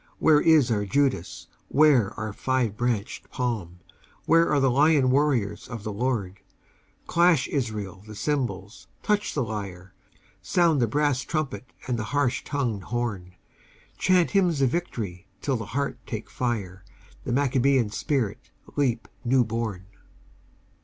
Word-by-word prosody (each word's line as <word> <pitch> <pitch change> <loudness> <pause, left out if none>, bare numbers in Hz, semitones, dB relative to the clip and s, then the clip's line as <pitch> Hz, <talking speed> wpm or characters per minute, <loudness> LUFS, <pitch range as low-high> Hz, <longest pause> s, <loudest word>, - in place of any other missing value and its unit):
Where 150 -2 +5
is 155 -7 +5
our 105 -2 +1
Judas? 130 -4 0 0.2
Where 140 -8 +4
our 110 -1 -4
five 125 -3 0
branched 115 -3 -2
palm? 105 -9 -3 0.4
Where 165 0 +4
are 145 - +3
the 135 -2 +3
lion 140 -1 +4
warriors 130 -8 +1
of 115 -4 -7
the 105 -2 -4
Lord? 105 -5 -2 0.7
Clash, 170 -6 +3
Israel, 105 -8 -3
the 105 - -9
cymbals, 110 -7 -3 0.2
touch 210 0 0
the 140 - +1
lyre, 95 -5 -6 0.5
Sound 165 -6 +2
the 120 - +3
brass 145 +1 +1
trumpet 150 -3 -3 0.2
and 120 -2 -1
the 110 - -3
harsh 130 -3 +1
tongued 120 -9 -2
horn, 105 -7 -3 0.6
Chant 185 -2 +3
hymns 180 -7 +2
of 135 -3 +3
victory 100 - -4
till 135 +5 -1
the 115 -3 -4
heart 140 0 -1
take 110 -2 -6
fire, 100 -7 -3 0.4
The - - -4
Maccabean 130 -3 +2
spirit 125 -4 -2 0.3
leap 125 -5 0 0.2
new 125 +1 +3
born! 110 -5 -3
125 Hz, 140 wpm, -26 LUFS, 105-145 Hz, 0.7 s, Where